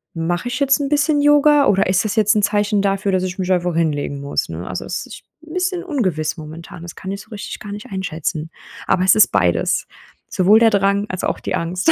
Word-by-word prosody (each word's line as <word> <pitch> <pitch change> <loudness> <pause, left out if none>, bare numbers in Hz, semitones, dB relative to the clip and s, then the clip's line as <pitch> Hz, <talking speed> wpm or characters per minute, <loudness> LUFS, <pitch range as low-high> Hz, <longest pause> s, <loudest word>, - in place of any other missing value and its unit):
mache 170 +5 -2
ich 245 - -3
jetzt 275 0 +3
'n 280 - -2
bisschen 295 0 +2
Yoga 295 0 +5
oder 195 -1 +3
ist 185 0 +2
das 215 - -2
jetzt 215 +1 +4
'n 210 - +2
Zeichen 205 0 +1
dafür, 195 0 0
dass 185 -1 +1
ich 185 -1 -4
mich 185 -1 -2
einfach 180 -1 -1
hinlegen 145 -3 -1
muss?“, 140 0 -2
ne? 80 +2 -6
Also 90 - -4
das - - -4
ist - - -11 0.2
'n 315 - -11
bisschen 365 0 -1
ungewiss 185 - -1
momentan, 160 +2 -10
das 175 - -9
kann 190 - -7
ich 200 0 -5
so 215 - -18
richtig 210 -2 -7
gar 205 - -8
nicht 205 +1 -7
einschätzen. 165 -4 -4 0.4
Aber 185 - +2
es 185 - +6
ist 215 - +6
beides. 85 -1 +1 0.4
Sowohl 200 +4 +4
der 225 -1 +5
Drang, 200 0 +2
als 185 - -5
auch - - -1
die - - -4
Angst. 180 - 0
195 Hz, 230 wpm, -19 LUFS, 170-225 Hz, 0.4 s, es